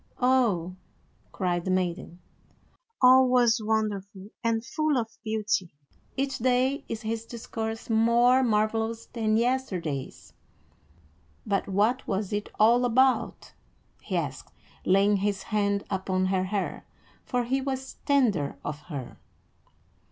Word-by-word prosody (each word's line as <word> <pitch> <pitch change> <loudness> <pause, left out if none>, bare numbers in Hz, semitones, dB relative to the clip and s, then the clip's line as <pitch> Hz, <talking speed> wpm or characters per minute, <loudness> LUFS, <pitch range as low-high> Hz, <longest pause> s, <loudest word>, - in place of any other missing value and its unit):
"Oh!" 220 -9 +2 0.5
cried 175 -2 -1
the 185 - -4
maiden, 180 -1 -2 0.8
"all 260 +1 +7
was 245 -2 +3
wonderful 205 -2 -2
and 230 0 0
full 310 +1 0
of 225 -2 -4
beauty. 215 -6 -1 0.4
Each 270 0 -1
day 255 +3 +1
is 225 0 -5
his 225 +1 -3
discourse 225 -1 -6
more 235 +3 +4
marvelous 225 0 0
than 220 -2 0
yesterday's." 190 - -2 1.1
"But 195 - -1
what 210 +6 +1
was 195 +1 -2
it 205 0 -2
all 235 +3 +5
about?" 255 +2 +1 0.5
he - - -3
asked, - - -4 0.4
laying 200 +2 +4
his 195 -1 -1
hand 200 -1 0
upon 190 -1 0
her 185 0 0
hair, 200 +1 -3 0.4
for 250 -2 -1
he 265 +3 0
was 265 0 -4
tender 220 - +1
of 150 0 -4
her. 135 -6 -7
220 Hz, 120 wpm, -27 LUFS, 195-245 Hz, 1.1 s, all